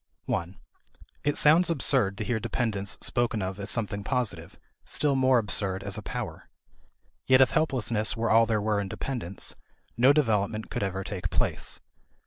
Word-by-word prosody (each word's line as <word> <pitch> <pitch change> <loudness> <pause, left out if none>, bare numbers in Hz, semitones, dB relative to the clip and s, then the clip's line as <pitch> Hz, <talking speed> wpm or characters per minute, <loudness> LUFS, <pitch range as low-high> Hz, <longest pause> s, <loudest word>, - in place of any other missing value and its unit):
(1) 90 +3 -3 0.7
It 145 0 0
sounds 160 +4 +5
absurd 130 -10 +2
to - - -2
hear 120 -3 -1
dependence 105 -3 -2
spoken 120 -4 0
of 95 +1 -4
as 100 +1 -4
something 105 -3 -2
positive, 105 -10 -2 0.3
still 145 -2 0
more 130 -1 +4
absurd 100 -3 -1
as 100 0 -4
a 110 - -5
power. - - -6 0.8
Yet 130 -1 +6
if 130 - +5
helplessness 120 -7 0
were 115 0 0
all 115 +1 +5
there 110 -2 +1
were 105 -1 +1
in 100 - -4
dependence, 100 -6 -4 0.4
no 125 +3 +6
development 110 -7 0
could - - -3
ever 95 -1 -2
take 90 -2 -4
place. - - -1
110 Hz, 160 wpm, -27 LUFS, 100-130 Hz, 0.8 s, Yet